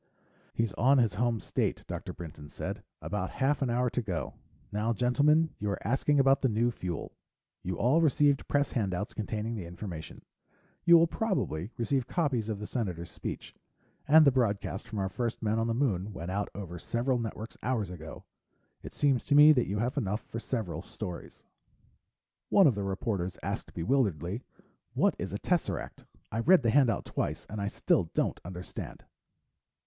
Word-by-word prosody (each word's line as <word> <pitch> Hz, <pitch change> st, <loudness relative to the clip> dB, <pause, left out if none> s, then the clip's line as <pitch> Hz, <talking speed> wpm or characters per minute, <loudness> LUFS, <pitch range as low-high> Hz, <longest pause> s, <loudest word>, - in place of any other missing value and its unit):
"He's 115 Hz, -3 st, 0 dB
on 135 Hz, +3 st, +4 dB
his 115 Hz, -5 st, +3 dB
home 115 Hz, +1 st, +1 dB
state," -, -, -1 dB
Dr. -, -, -5 dB
Brinton 75 Hz, -3 st, -9 dB
said. -, -, -5 dB, 0.2 s
"About -, -, -2 dB
half 140 Hz, +2 st, 0 dB
an 135 Hz, -, +1 dB
hour 125 Hz, +1 st, +2 dB
to 125 Hz, -, 0 dB
go. 90 Hz, -, -3 dB, 0.4 s
Now, 110 Hz, +3 st, 0 dB
gentlemen, 145 Hz, +8 st, +3 dB
you 105 Hz, -, -2 dB
were 100 Hz, -2 st, 0 dB
asking 140 Hz, +3 st, +2 dB
about 135 Hz, 0 st, +4 dB
the 130 Hz, -, +3 dB
new 115 Hz, +2 st, +2 dB
fuel. 90 Hz, -6 st, -5 dB, 0.5 s
You 90 Hz, -2 st, -3 dB
all 140 Hz, +8 st, +3 dB
received 145 Hz, -2 st, +3 dB
press 145 Hz, 0 st, +1 dB
handouts 100 Hz, -3 st, -1 dB
containing 110 Hz, +1 st, -3 dB
the 100 Hz, -7 st, -5 dB
information. 85 Hz, -2 st, -8 dB, 0.6 s
You 170 Hz, -1 st, +9 dB
will 165 Hz, -, +6 dB
probably 165 Hz, -, -1 dB
receive 130 Hz, +1 st, 0 dB
copies 135 Hz, -, 0 dB
of 110 Hz, -, -2 dB
the 105 Hz, -, -6 dB
Senator's 90 Hz, -8 st, -3 dB
speech. -, -, -6 dB, 0.5 s
And 155 Hz, +1 st, +8 dB
the 140 Hz, -, +7 dB
broadcast 105 Hz, -4 st, -1 dB
from 110 Hz, -2 st, -6 dB
our 95 Hz, -1 st, 0 dB
first 120 Hz, +3 st, -3 dB
men 110 Hz, +1 st, +1 dB
on 115 Hz, -, 0 dB
the 115 Hz, -, 0 dB
Moon 105 Hz, -7 st, 0 dB
went 85 Hz, 0 st, -5 dB
out 100 Hz, +2 st, -1 dB
over 90 Hz, -4 st, -6 dB
several 120 Hz, +6 st, 0 dB
networks 110 Hz, 0 st, -6 dB
hours 110 Hz, -6 st, -1 dB
ago. 80 Hz, -3 st, -9 dB, 0.6 s
It -, -, -10 dB
seems 140 Hz, -4 st, +2 dB
to 145 Hz, -, +2 dB
me 150 Hz, +1 st, +9 dB
that 125 Hz, -5 st, +3 dB
you 100 Hz, -, -2 dB
have 125 Hz, +7 st, -1 dB
enough 105 Hz, -3 st, -2 dB
for 115 Hz, -, -6 dB
several 110 Hz, -8 st, -3 dB
stories." 90 Hz, -1 st, -8 dB, 1.1 s
One 195 Hz, -, +6 dB
of 140 Hz, -, +6 dB
the 100 Hz, -, -3 dB
reporters 95 Hz, -2 st, -2 dB
asked -, -, -4 dB
bewilderedly, 95 Hz, -, 0 dB, 0.5 s
"What -, -, +3 dB
is -, -, -3 dB
a -, -, -2 dB
tesseract? -, -, -2 dB, 0.3 s
I 115 Hz, -, -2 dB
read 170 Hz, +5 st, +5 dB
the 115 Hz, -, +3 dB
handout 130 Hz, -3 st, +3 dB
twice -, -, -3 dB
and 105 Hz, 0 st, -5 dB
I 100 Hz, -, -1 dB
still 95 Hz, -2 st, +2 dB
don't -, -, 0 dB
understand." 90 Hz, +1 st, -7 dB
115 Hz, 175 wpm, -30 LUFS, 95-135 Hz, 1.1 s, You